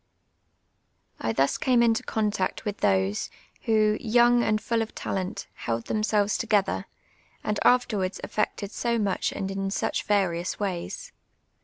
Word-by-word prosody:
I 115 - -1
thus 135 +4 +1
came 245 -2 +3
into 225 -1 +3
contact 210 -1 -1
with 210 -1 -2
those, 95 +1 +1 0.4
who, 215 -2 +3
young 240 +1 +4
and 215 -2 +1
full 230 +1 0
of 225 - -5
talent, 185 -1 -3
held 115 0 -3
themselves 215 -1 +1
together, 210 -4 +1 0.6
and 210 -1 -1
afterwards 210 -6 +2
effected 210 -1 -2
so 235 +1 0
much 200 -4 0
and 195 0 -4
in 195 0 -2
such 195 - -1
various 185 -4 0
ways. 205 - -4
210 Hz, 135 wpm, -26 LUFS, 190-225 Hz, 0.6 s, young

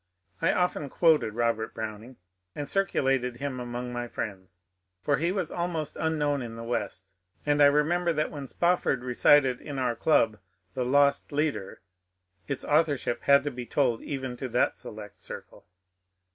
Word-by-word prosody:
I - - +3
often 180 -5 0
quoted 155 -11 +3
Robert 115 -1 0
Browning, 110 +3 -6 0.4
and 145 -1 -4
circulated 135 -10 +1
him 135 -1 -4
among 120 0 -5
my 120 0 -3
friends; 95 -5 -7 0.4
for 145 - +2
he 170 +5 0
was 185 -4 -2
almost 170 -3 -3
unknown 150 -3 0
in 115 -2 -6
the 115 - -7
West, 100 -4 -4 0.3
and 145 0 +2
I 145 - +9
remember 165 +5 +2
that 155 -1 -1
when 140 -3 -6
Spofford 170 -6 +1
recited 130 +1 +4
in 145 -2 -6
our 125 -3 0
club 115 -8 +3
^^ - - -32 0.3
The 125 - -1
Lost 140 +2 +3
Leader," 145 -9 -2 0.7
its - - -3
authorship 145 -6 +1
had 140 0 +6
to 145 - -2
be 125 -2 -7
told 125 -5 +1
even 130 -3 -4
to 130 - -4
that 120 +2 +1
select 105 -1 -10
circle. - - -9
135 Hz, 160 wpm, -28 LUFS, 120-150 Hz, 0.7 s, I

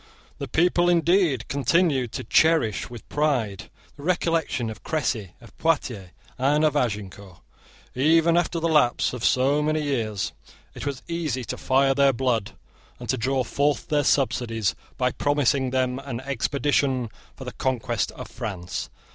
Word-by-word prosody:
The - - -4
people, 175 +1 +2
indeed, 170 - +2
continued 140 -2 +1
to - - -4
cherish 155 -4 +2
with 120 -3 -11
pride 125 -10 -1 0.3
the - - -11
recollection 165 -8 0
of 110 - -11
Cressy, 120 - -2
of 115 -2 -16
Poitiers, 125 - 0 0.3
and 145 +4 +3
of 150 -1 +1
Agincourt. 100 -7 -3 0.5
Even 165 +5 +3
after 175 -1 +1
the 165 - 0
lapse 150 -8 +2
of 125 - -6 0.4
many 155 0 0
years 115 -8 -2 0.4
it - - -6
was 135 -2 -4
easy 160 -7 -2
to - - -4
fire 135 +1 +2
their 140 0 +4
blood 115 -4 -1 0.5
and 120 -2 -9
to 130 - +2
draw 130 +2 0
forth 145 +6 0
their 150 -2 +2
subsidies 120 -7 +1 0.2
by 125 -2 +1
promising 140 -2 +1
them 130 0 0
an 135 -4 -5
expedition 135 -2 0 0.2
for - - -9
the - - -5
conquest 120 -3 -1
of - - -8
France. 90 -4 -5
135 Hz, 145 wpm, -24 LUFS, 120-150 Hz, 0.5 s, their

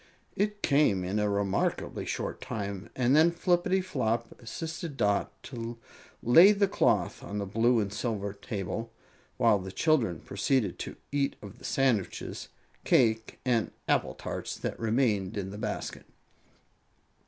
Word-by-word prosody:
It 205 0 -1
came 140 -10 +3
in 95 +4 -1
a 105 0 +1
remarkably 100 -1 -1
short - - -3
time, 100 -2 -5
and 125 +1 +3
then 160 +2 +6
Flippityflop 175 - 0
assisted 160 - -5
Dot 100 -4 +1
to 115 -2 -6 0.5
lay 170 - +8
the 200 -1 +2
cloth - - +1
on 105 - -5
the 100 - -2
blue 115 +4 +3
and 100 -1 -2
silver 105 -3 -2
table, 105 +1 -4 0.5
while 105 - +4
the 95 0 -7
children 115 - +2
proceeded 100 -1 0
to - - -5 0.2
eat 140 -1 0
of 100 -2 -10
the - - -11
sandwiches, 125 -8 0 0.3
cake 110 -2 +2
and 120 -4 +2 0.2
apple - - +1
tarts - - -5
that - - -4
remained 110 -4 +1
in 95 -1 -3
the 105 - -7
basket. - - -4
115 Hz, 140 wpm, -29 LUFS, 100-140 Hz, 0.5 s, lay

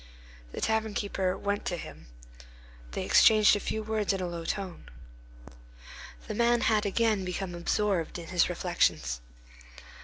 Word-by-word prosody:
The - - -6
tavern 220 -1 0
keeper 195 -2 -1
went 200 +1 -2
to 175 - -2
him. 80 - -10 0.9
They - - -3
exchanged 215 -2 +6
a - - -1
few 220 +1 -3
words 215 -2 0
in 195 - -2
a 185 - -2
low 170 -1 -5
tone. 190 -1 -4 1.4
The - - -4
man 235 +2 +2
had 215 -2 +2
again 215 -1 +1
become 180 0 -4
absorbed 175 0 -1
in 170 -2 -9
his 175 -1 +2
reflections. 170 - 0
195 Hz, 145 wpm, -29 LUFS, 175-215 Hz, 1.4 s, exchanged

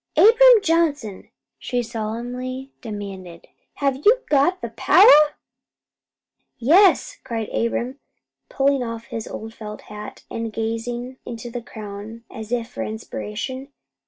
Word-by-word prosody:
"Abram 470 0 +7
Johnson," 300 - 0 0.3
she 245 -1 -2
solemnly 245 +4 -5
demanded, 195 -6 -8 0.3
"have 275 -2 0
you 440 - +4
got 295 +6 +3
the - - -6
power?" 305 -6 +6 1.2
"Yes," 330 - +4
cried 230 -4 -4
Abram, 240 +3 -1 0.5
pulling 275 0 +2
off 230 -1 -4
his 225 - -6
old 225 0 -7
felt 210 -2 -8
hat, 210 0 -10
and 230 -1 -4
gazing 235 +3 -4
into 235 0 -7
the 245 0 -5
crown 220 0 -9
as 220 0 -8
if 235 -2 -1
for - - -7
inspiration. 225 +4 -5
240 Hz, 120 wpm, -22 LUFS, 220-275 Hz, 1.2 s, Abram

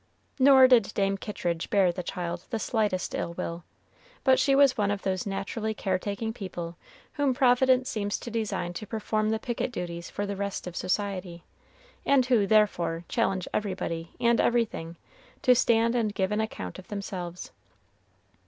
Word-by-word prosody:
Nor 265 -1 +8
did 235 -5 +4
Dame 195 -1 +1
Kittridge 175 -5 -3
bear 195 -4 +4
the 180 - -5
child 175 0 -5
the 230 - -1
slightest 210 -5 -1
ill 170 - -3
will, 170 0 -4 0.6
but 260 -1 +5
she 275 -2 +3
was 275 -2 +5
one 205 -2 +1
of 205 -1 -2
those 190 0 -1
naturally 205 +3 -3
care 190 -2 -1
taking 210 +3 -3
people 175 -6 -6 0.4
whom 280 -3 +1
Providence 255 0 +4
seems 205 -2 -2
to 235 - -7
design 215 -6 -2
to 215 +4 -7
perform 215 0 -1
the 220 - +1
picket 240 +2 -3
duties 170 -5 -5
for 205 - -3
the 200 0 -3
rest 200 0 -4
of 180 -1 -7
society, 185 -2 -2 0.6
and 275 -3 +4
who, 235 -6 +3
therefore, 175 -6 +2
challenge 195 -6 0
everybody 175 -5 -3
and 235 -1 +3
everything 215 -8 0 0.5
to 250 - +6
stand 230 -1 +3
and 220 -4 0
give 190 -1 0
an 210 +1 +1
account 95 - -5
of 185 - -13
themselves. 185 -4 -6
205 Hz, 165 wpm, -27 LUFS, 180-230 Hz, 0.6 s, Nor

